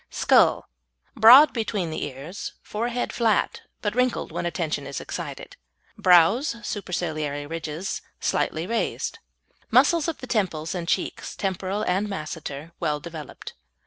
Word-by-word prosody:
SKULL - - +3 0.5
Broad 260 +7 +9
between 205 -7 -2
the - - -3
ears, 145 +7 -7
forehead 240 +3 -3
flat, 225 -3 +1 0.2
but 205 -1 0
wrinkled 250 +1 0
when - - -2
attention 155 -5 -2
is 140 - -4
excited. - - -7 0.4
Brows 185 - +4
(superciliary 155 -7 -3
ridges) 165 +3 -4 0.2
slightly 160 +1 -1
raised. 230 +4 -2 0.5
Muscles 335 -2 +4
of 330 - -2
the - - -8
temples 185 -10 -1
and 175 -2 -4
cheeks 185 - -2
(temporal 195 +1 -2
and 190 +4 0
masseter) 155 -3 -6
well 150 -1 0
developed. 160 -1 -9
180 Hz, 125 wpm, -25 LUFS, 155-220 Hz, 0.5 s, Broad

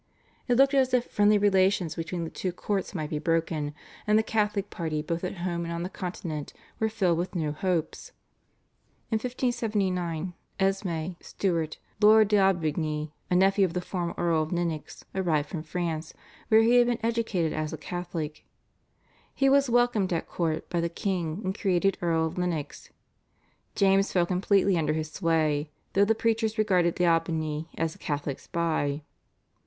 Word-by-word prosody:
It 245 - +3
looked 275 +1 +5
as 260 -2 +3
if 245 -1 +1
friendly 205 0 +3
relations 190 -4 +3
between 165 +1 -4
the 165 - -5
two 185 - -3
courts 195 +2 -3
might 155 -3 -3
be 150 - -1
broken, 155 -2 -1 0.3
and 210 0 +5
the 220 - +3
Catholic 210 -2 0
party 155 -3 -2
both 170 +2 -3
at 180 - -3
home 170 -1 -1
and 170 - -4
on 170 0 -3
the 180 - -3
Continent 170 -5 -5 0.3
were 220 - +1
filled 185 -6 +1
with 180 +2 -3
new 155 -3 0
hopes. 175 - -2 1.0
In 220 - +3
1579 200 -8 -1 0.3
Esmé 185 -3 -1
Stuart, 165 -5 -1 0.2
Lord 215 0 +7
d'Aubigny, 160 -6 +1 0.2
a 180 - +2
nephew 195 +2 +4
of 180 -3 +1
the 180 - 0
former 175 -1 -3
Earl 170 -2 +2
of 155 - -3
Lennox, 170 -3 -3
arrived 160 -6 0
from 165 - -4
France, 160 -1 -4 0.3
where 220 0 +6
he 240 +2 +5
had 240 0 +5
been 240 -1 +1
educated 220 -8 0
as 155 0 -2
a 160 - -5
Catholic. 165 -2 -5 0.9
He 270 - +3
was 275 -1 +4
welcomed 240 -5 +2
at 165 - -1
court 160 -2 -2
by 170 -2 -1
the 170 - 0
king 175 -1 -2
and 190 +1 -2
created 195 -2 +1
Earl 165 -2 +2
of 160 +3 -4
Lennox. 165 -5 -3 0.9
James 195 0 +3
fell 175 -2 +3
completely 190 0 +2
under 155 -1 +1
his 155 0 -3
sway, 155 -4 +1 0.2
though 200 +1 +5
the 225 +2 +2
preachers 225 0 0
regarded 180 -5 +2
d'Aubigny 165 -2 0
as 165 -1 -1
a - - -18
Catholic 145 -2 -3
spy. 155 -3 -1
175 Hz, 165 wpm, -27 LUFS, 160-200 Hz, 1.0 s, Lord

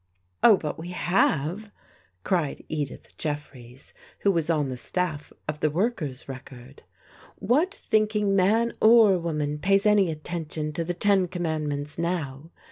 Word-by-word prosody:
" 90 0 -45
Oh, 215 -4 +8
but 150 -3 -5
we 165 - -7
have," 180 +2 0 0.5
cried 170 -6 -1
Edith 150 -3 -5
Jeffreys, 140 -4 -6 0.3
who 200 - +4
was 165 -3 -1
on 150 -4 +1
the 130 - -4
staff 155 +3 -3 0.2
of 150 0 -3
the 155 - +2
Workers' 160 - -2
Record, 130 0 -11 0.5
"What 290 - +1
thinking 215 - +1
man 220 +5 +3
or 220 -4 +6
woman 150 -3 -2
pays 195 +4 +2
any 205 -4 +4
attention 155 -1 -4
to 165 - -2
the 175 +1 -3
Ten 195 0 +3
Com 175 0 -5
mandments 150 -2 -3
now? 165 -4 -3
165 Hz, 145 wpm, -26 LUFS, 150-195 Hz, 0.5 s, Oh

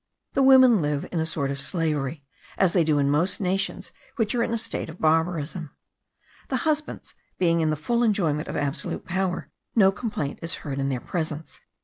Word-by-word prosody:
The 275 - +2
women 260 -6 +7
live 145 -1 -1
in 170 - -1
a 160 - 0
sort 140 -4 -1
of 140 0 -4
slavery, 150 -3 -2 0.3
as 190 -3 +3
they 175 - +4
do 155 -2 +2
in 140 0 +2
most 165 +6 +1
nations 195 +1 -1 0.2
which 220 -3 0
are 240 - +1
in 230 - 0
a 230 - +1
state 225 - -3
of - - -10
barbarism. 160 0 0 0.7
The 260 - 0
husbands 305 -1 -2 0.2
being 170 -2 +2
in 160 - +2
the 155 - +1
full 235 +11 0
enjoyment 175 -10 +1
of - - -5
absolute 145 0 -2
power, 185 0 -2 0.2
no 195 -4 +6
complaint 200 - -4
is 165 0 -1
heard 140 -2 -3
in 135 0 0
their 130 -3 -2
presence. 155 -3 -4
165 Hz, 195 wpm, -25 LUFS, 150-200 Hz, 0.7 s, women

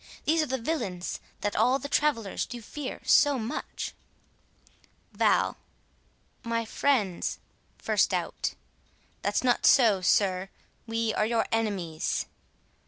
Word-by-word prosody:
these 320 +1 +3
are 305 - -1
the 265 - -1
villains 225 - -3 0.2
That 205 - -1
all 255 +2 +4
the 275 - -6
travellers 280 -9 0
do 245 - -7
fear 260 +5 -6
so 290 -2 +5
much. 225 0 -4 1.2
Val: - - +2 0.9
My 230 -1 -1
friends,— 220 -7 0 0.5
1st - - +3
Out: - - -2 0.7
That's - - 0
not 245 -1 +3
so, 225 -8 +5
sir, 185 0 +2 0.4
we 225 -1 0
are 215 - +1
your 230 0 +1
enemies. 195 -8 -1
230 Hz, 115 wpm, -28 LUFS, 200-265 Hz, 1.2 s, so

